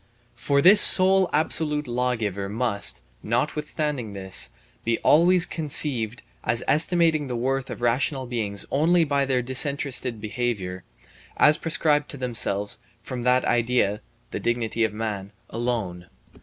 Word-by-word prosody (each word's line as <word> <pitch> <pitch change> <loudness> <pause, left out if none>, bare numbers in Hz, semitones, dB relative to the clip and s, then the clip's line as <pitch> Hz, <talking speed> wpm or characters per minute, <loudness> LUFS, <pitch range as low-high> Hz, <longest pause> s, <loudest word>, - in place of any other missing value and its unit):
For 140 -1 0
this 200 +3 +8
sole 190 0 +5
absolute 150 -1 0
lawgiver 115 -6 -2
must, 105 - -2 0.2
notwithstanding 145 0 -3
this, 95 -1 -2 0.3
be 115 0 0
always 175 +3 +4
conceived 135 -7 +1 0.2
as 120 +1 +1
estimating 160 0 +3
the 125 - -4
worth 135 +2 -2
of - - -8
rational 130 +3 0
beings 110 -5 -3
only 165 +5 +3
by 140 -2 0
their 130 -2 0
disinterested 130 -2 0
behaviour, 105 -5 -4 0.5
as 150 +1 +4
prescribed 150 -2 0
to 145 - -7
themselves 110 -5 -2 0.2
from 125 -1 -6
that 125 0 +2
idea 115 -3 0 0.3
[the - - -4
dignity 115 -1 -1
of 110 - 0
man] 105 -2 -5 0.2
alone. 110 -7 -3
125 Hz, 130 wpm, -24 LUFS, 110-150 Hz, 0.5 s, this